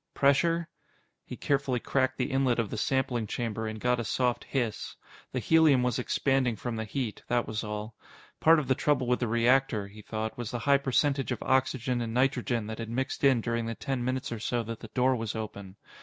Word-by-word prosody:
Pressure? 165 +4 +3 0.6
He - - -8
carefully 140 -3 0
cracked 130 +1 0
the 125 - -1
inlet 135 -2 +2
of 115 -4 -1
the - - -3
sampling 125 -1 0
chamber 110 -1 -3
and 110 0 -5
got 125 +2 +1
a - - -1
soft 125 +3 0
hiss. 120 -6 -2 0.4
The - - -4
helium 150 0 +4
was 125 0 0
expanding 130 -1 +1
from 120 +2 -4
the 110 0 -3
heat, 120 -1 -4
that 120 -1 +1
was 110 +1 -3
all. 105 +1 -5 0.5
Part 165 +1 +6
of 150 -4 -1
the 130 - +4
trouble 135 -1 +1
with 125 0 +1
the 120 - 0
reactor, 120 -1 +2
he 105 +2 -12
thought, 110 +2 -4
was 120 -3 -3
the 120 - -3
high 140 -1 +5
percentage 135 0 +1
of 125 - -3
oxygen 130 -1 +1
and 115 -1 -4
nitrogen 125 -3 +1
that 110 +1 -6
had 115 -1 -5
mixed 130 +4 -3
in 135 -4 +5
during 115 0 -2
the 115 - -3
ten 130 0 -3
minutes 130 0 -2
or 115 - -4
so 120 +2 -1
that 115 0 -6
the 115 - -10
door 130 0 +3
was 115 -2 -4
open. 100 -3 -6
125 Hz, 215 wpm, -29 LUFS, 115-135 Hz, 0.6 s, Part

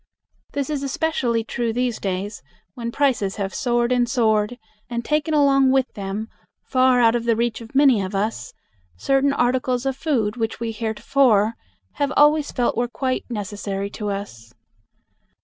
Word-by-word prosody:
This 280 +1 -2
is 290 -2 -2
especially 270 -5 0
true 230 +1 -2
these 245 0 -1
days, 195 +2 -3 0.3
when 235 +2 -5
prices 245 -8 +1
have 195 -2 -3
soared 240 -1 0
and 245 -1 +2
soared 220 -1 +1 0.3
and 235 -1 -3
taken 305 +1 0
along 275 -2 +4
with 265 -1 +1
them, 200 +1 -4 0.4
far 255 -1 +3
out 230 -1 +5
of 235 -1 -2
the 230 -1 +3
reach 235 0 -1
of 230 +3 -12
many 270 -6 +5
of 190 +1 -4
us, 195 - -2 0.5
certain 270 - +2
articles 250 -1 0
of 270 -1 0
food 250 -7 -1
which 225 -2 -2
we 230 -1 -2
heretofore 220 0 +2 0.4
have 285 -1 0
always 295 0 +4
felt 245 -2 0
were 240 +1 0
quite 255 +1 -3
necessary 200 -2 -4
to 210 -1 -4
us. 120 - -7
235 Hz, 160 wpm, -22 LUFS, 210-265 Hz, 0.5 s, out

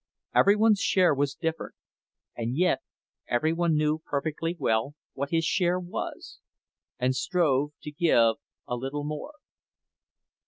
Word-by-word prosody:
Every 200 +1 +5
one's 215 -1 +4
share 185 -5 +3
was 140 -1 -1
different—and 150 -6 -6
yet 180 +1 +3 0.5
every 155 +7 +1
one 170 -1 +1
knew 155 +1 +1
perfectly 155 +3 -3
well 115 +2 0 0.2
what 140 +1 -3
his 165 -1 +1
share 180 +1 +1
was, 180 0 -6 0.6
and 130 +1 +1
strove 150 -4 +1
to 150 - -6
give 120 -8 +3 0.3
a 125 - -2
little 135 +4 -4
more. 150 - -5
155 Hz, 125 wpm, -27 LUFS, 135-175 Hz, 0.6 s, Every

